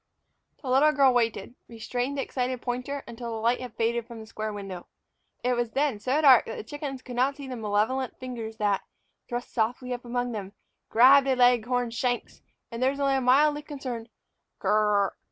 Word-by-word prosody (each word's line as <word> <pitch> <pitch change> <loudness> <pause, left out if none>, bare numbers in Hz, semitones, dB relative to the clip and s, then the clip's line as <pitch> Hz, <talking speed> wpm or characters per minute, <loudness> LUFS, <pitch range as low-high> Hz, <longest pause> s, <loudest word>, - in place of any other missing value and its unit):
The - - -7
little 270 +4 +5
girl 275 -3 +5
waited, 230 -3 0
restraining 245 +4 -3
the 275 - -1
excited 255 -1 -2
pointer, 255 +3 -4
until 235 0 -7
the 225 - -4
light 235 +3 +1
had 250 - -8
faded 230 0 -1
from 235 -2 -9
the 220 - -9
square 215 0 -5
window. 195 -3 -7 0.6
It 250 0 +2
was 240 -1 -1
then 275 -6 0
so 255 +7 0
dark 265 -5 +7
that 225 - -5
the - - -6
chickens 270 +1 -6
could 250 - -8
not 260 +3 +2
see 280 -1 -9
the 255 - -5
malevolent 220 +4 -1
fingers 230 -4 -6
that, 205 -2 +1 0.5
thrust 240 0 -5
softly 245 +2 -1
up 245 - -6
among 245 0 -2
them, 200 -3 -6 0.4
grabbed 270 +4 +6
a 265 - +3
leghorn's 245 -1 +2
shanks; 245 +1 -2 0.3
and 230 +1 -6
there 260 - +4
was 280 +1 -4
only 275 -1 +2
a 265 - +1
mildly 290 +4 +4
concerned 260 -6 -6 0.5
"k - - -5
r - - +4
r 210 - +2
r!" 195 - -2
245 Hz, 205 wpm, -27 LUFS, 225-265 Hz, 0.6 s, dark